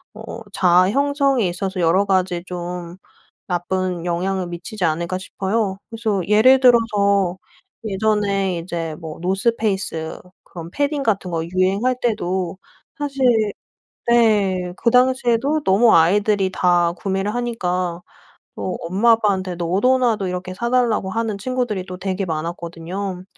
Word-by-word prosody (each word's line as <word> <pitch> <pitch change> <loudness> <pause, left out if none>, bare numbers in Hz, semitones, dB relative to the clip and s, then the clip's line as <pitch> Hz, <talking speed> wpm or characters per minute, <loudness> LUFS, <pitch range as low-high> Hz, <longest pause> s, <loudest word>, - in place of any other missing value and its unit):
어 220 +1 -8
자아 180 0 +4
형성에 275 -2 +1
있어서 190 +2 -4
여러 180 +4 +3
가지 185 -3 0
좀 175 -1 -6 0.5
나쁜 180 -1 -2
영향을 180 +2 -1
미치지 175 +4 -6
않을까 170 +3 -1
싶어요. 195 +1 -2
그래서 220 -4 -1
예를 225 +6 +6
들어서 200 -7 +3 0.5
예전에 200 -3 0
이제 165 -2 -4
뭐 160 -2 -8
노스페이스 190 -4 -1 0.2
그런 170 -1 -10
패딩 285 +2 -1
같은 195 -6 0
것 165 -1 -2
유행할 190 +8 +1
때도 190 -6 -1 0.4
사실 275 -2 -3 0.9
네. 205 -6 +2
그 235 - +1
당시에도 255 +3 +2
너무 220 +4 +5
아이들이 195 +3 +3
다 175 -2 +3
구매를 195 +2 -2
하니까 180 -8 -2 0.5
뭐 185 - -4
엄마 195 +8 +2
아빠한테 195 -5 0
너도나도 205 +4 +1
이렇게 180 0 -5
"사달라."고 235 -2 0
하는 225 0 -2
친구들이 245 -4 -2
또 185 -1 -7
되게 195 +1 -2
많았거든요. 170 +3 -5
195 Hz, 285 characters per minute, -20 LUFS, 180-225 Hz, 0.9 s, 예를